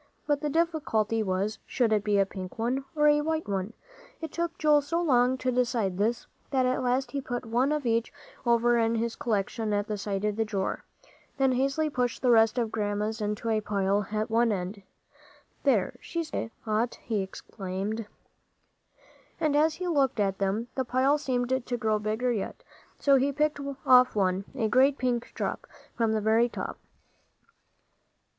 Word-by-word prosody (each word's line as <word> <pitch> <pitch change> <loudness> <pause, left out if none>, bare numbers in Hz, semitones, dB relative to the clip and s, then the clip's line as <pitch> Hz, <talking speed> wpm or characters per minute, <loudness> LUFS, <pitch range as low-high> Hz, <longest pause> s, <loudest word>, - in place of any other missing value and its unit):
But 290 -1 +1
the 300 - -1
difficulty 285 -10 0
was, 200 +2 -1
should 235 -4 +1
it 210 -1 +2
be 205 -1 +2
a 195 - +4
pink 185 -2 -8
one 250 +4 -1
or 300 -1 +4
a 295 0 +5
white 320 +1 -2
one? 195 +2 -2 0.5
It 320 -3 -6
took 340 -1 -3
Joel 300 -1 +4
so 330 +4 -1
long 260 -6 +3
to 255 0 -1
decide 235 -7 0
this, 225 +3 0 0.2
that 260 -2 +2
at 255 +1 +1
last 250 0 0
he 280 - -2
put 245 -2 -4
one 245 +5 +1
of 300 -3 -1
each 230 0 +1 0.3
over 235 0 +3
in 225 0 +2
his 230 0 -1
collection 215 0 -1
at 205 0 0
the 210 -1 -4
side 200 0 -2
of 210 0 -1
the 225 - +2
drawer, 200 -3 -3 0.5
then 270 -1 +3
hastily 275 +5 +1
pushed 250 -2 -1
the 250 - +4
rest 225 +1 +5
of 230 -3 0
Grandma's 210 +1 -2
into 210 +2 -2
a 220 -1 +1
pile 200 -1 0
at 215 +2 -2
one 230 0 +3
end. 195 +1 -3 0.8
"There, - - +1
she's 335 -2 -4
got - - -2
a - - -4 0.2
lot," 220 +2 0
he 220 -4 -1
exclaimed. 195 +2 -5 1.3
And 300 -2 +1
as 310 +1 +3
he 365 - -4
looked 275 -7 +1
at 195 -2 0
them, 200 +4 0
the 260 - -1
pile 260 +4 +2
seemed 255 -2 -1
to 245 0 -3
grow 220 -2 +1
bigger 220 +4 -1
yet; 215 -5 -4 0.3
so 280 -1 +4
he 275 +2 +2
picked 300 +1 0 0.3
off 255 -2 +6
one, 190 -1 +1
a 230 -5 0
great 265 +5 +4
pink 245 -2 -1
drop, - - -3 0.3
from 225 -2 +1
the 215 - 0
very 225 +3 +3
top. - - -6
235 Hz, 180 wpm, -28 LUFS, 210-265 Hz, 1.3 s, off